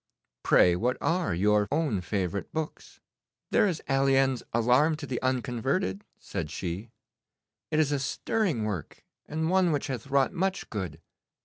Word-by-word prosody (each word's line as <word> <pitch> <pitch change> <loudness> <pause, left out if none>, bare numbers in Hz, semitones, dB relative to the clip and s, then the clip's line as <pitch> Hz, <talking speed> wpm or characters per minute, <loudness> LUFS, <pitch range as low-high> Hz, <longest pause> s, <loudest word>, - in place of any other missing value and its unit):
Pray, 90 -1 +5
what 120 +7 0
are 170 - 0
your 105 +4 +2
own 145 - +1
favourite 95 -1 -2
books?' 160 -1 -5 0.5
'There - - +4
is 175 -5 -2
Alleine's 135 -2 +3
"Alarm 125 +7 +3
to 150 -1 -7
the 130 -3 -3
Unconverted,"' 130 - -1
said 85 -6 -5
she. 90 +7 -4 0.8
'It 155 - 0
is 150 -2 +3
a 145 - +1
stirring 155 - -1
work, 100 -7 -5 0.2
and 160 +2 -1
one 185 -2 +4
which 145 -2 0
hath 130 -1 -5
wrought 140 -1 +2
much 190 +1 -2
good. 90 -7 -4
130 Hz, 145 wpm, -28 LUFS, 105-155 Hz, 0.8 s, Pray